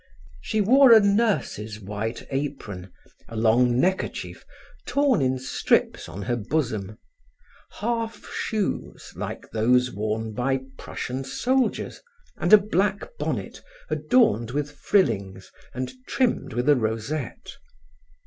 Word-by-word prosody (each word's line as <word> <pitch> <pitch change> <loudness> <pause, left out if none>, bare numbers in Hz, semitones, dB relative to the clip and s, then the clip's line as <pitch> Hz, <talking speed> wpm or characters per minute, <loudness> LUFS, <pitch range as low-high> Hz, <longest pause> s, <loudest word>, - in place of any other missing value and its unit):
She 215 - 0
wore 260 +5 +6
a 225 - +10
nurse's 200 - 0
white 105 +3 -4
apron, 135 -10 -4 0.4
a 115 - -8
long 120 +2 +3
neckerchief, 190 +5 -1 0.4
torn 280 - +2
in 130 0 +1
strips 130 +1 0
on 100 +4 -6
her 120 +4 0
bosom; 110 -4 -2 0.8
half 230 -1 -3
shoes 215 -3 -3
like - - -6
those 125 +3 +3
worn 110 +2 -3
by 130 +3 0
Prussian 130 +2 -5
soldiers 250 - -1 0.4
and - - -1
a 215 - +12
black 205 - -1
bonnet - - -3 0.3
adorned 220 - +3
with 145 +3 -2
frillings 100 - 0 0.2
and 130 +1 -4 0.2
trimmed 235 - 0
with 120 +3 -1
a 145 - +7
rosette. 115 +4 -3
130 Hz, 115 wpm, -25 LUFS, -, 0.8 s, a